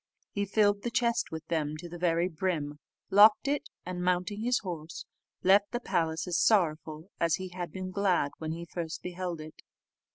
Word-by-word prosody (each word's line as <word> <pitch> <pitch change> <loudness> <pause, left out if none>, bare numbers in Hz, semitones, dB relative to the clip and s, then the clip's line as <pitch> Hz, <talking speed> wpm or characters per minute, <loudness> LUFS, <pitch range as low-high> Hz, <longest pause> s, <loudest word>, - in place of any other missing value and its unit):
He 200 0 -1
filled 205 0 +2
the 240 - -2
chest 235 0 +1
with 160 0 -6
them 155 -2 -1
to 175 +2 -8
the 175 0 -9
very 170 0 +2
brim, 155 -4 -2 0.3
locked 210 +5 +7
it, 285 +1 -1 0.2
and, 180 0 -4
mounting 180 +3 0
his 245 +1 +2
horse, 165 -4 -6 0.4
left 200 +2 +5
the 240 - -1
palace 165 -8 -1
as 180 -1 0
sorrowful 160 -4 +1
as 170 -1 +3
he 185 -1 -6
had 175 -2 -5
been 185 +1 -5
glad 185 -7 +1
when 160 -1 -3
he 170 +1 -5
first 170 -1 -5
beheld 180 -2 -4
it. 155 0 -10
180 Hz, 185 wpm, -30 LUFS, 160-200 Hz, 0.4 s, locked